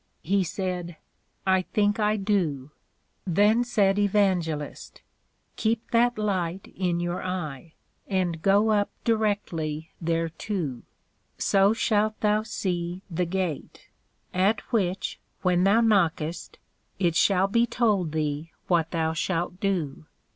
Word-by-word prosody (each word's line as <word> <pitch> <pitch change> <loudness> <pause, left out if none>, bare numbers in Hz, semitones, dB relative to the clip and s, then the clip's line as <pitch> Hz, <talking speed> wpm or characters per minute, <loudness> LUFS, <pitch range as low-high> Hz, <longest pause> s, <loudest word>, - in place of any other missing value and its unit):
He 195 +3 +2
said, 180 -2 -4 0.5
I 190 -1 +4
think 205 +3 0
I 210 0 +2
do. 170 -9 -1 0.6
then 210 +7 +4
said 205 -5 +2
Evangelist, 185 -7 0 0.5
Keep 225 0 -1
that 240 0 +3
Light 190 -3 -2
in 180 -2 0
your 175 +1 -2
eye, 165 -4 -5 0.3
and 180 -4 -1
go 205 +4 +4
up 205 -1 +2
directly 175 -9 -1
thereto: 165 - -2 0.6
so 195 +1 +3
shalt 215 -1 +1
thou 210 0 +3
see 180 -4 -3
the 175 +2 0
Gate; 175 -4 -4 0.4
at 195 +4 +2
which, 185 -4 0 0.2
when 180 0 +3
thou 210 +4 +5
knockest, 175 -7 +1 0.4
it 175 -3 +1
shall 195 +1 +4
be 235 +4 +2
told 215 -8 +1
thee 155 0 -2 0.2
what 165 -3 +2
thou 160 -1 0
shalt 175 +2 -2
do. 165 -7 -2
185 Hz, 120 wpm, -26 LUFS, 165-205 Hz, 0.6 s, thou